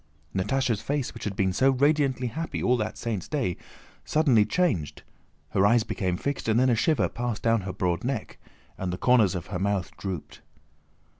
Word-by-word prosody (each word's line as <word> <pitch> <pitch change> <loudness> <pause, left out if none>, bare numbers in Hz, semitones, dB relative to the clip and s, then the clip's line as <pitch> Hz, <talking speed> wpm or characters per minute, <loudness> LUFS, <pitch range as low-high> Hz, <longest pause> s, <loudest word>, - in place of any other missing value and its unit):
Natásha's 115 +3 0
face, 140 +3 -2
which 115 - -8
had 100 -2 -3
been 95 -1 +1
so 135 +8 +4
radiantly 135 -1 +2
happy 155 +8 -3
all 125 - +4
that 110 -3 -3
saint's 110 -6 -3
day, 130 - -1 0.5
suddenly 135 -9 +3
changed: 105 - 0 0.5
her 95 - +2
eyes 115 +3 +5
became 90 -4 -2
fixed, 140 +4 -3
and 110 +2 +3
then 130 0 +4
a - - +3
shiver 155 +6 +2
passed 120 -2 -4
down 115 -1 +3
her 95 0 -4
broad 90 -2 -1
neck 125 -2 -3 0.4
and 95 -2 -2
the 90 - -3
corners 110 -4 +4
of 85 -1 -4
her 90 - -1
mouth 100 -2 -1
drooped. 95 -6 -6
115 Hz, 180 wpm, -26 LUFS, 95-130 Hz, 0.5 s, eyes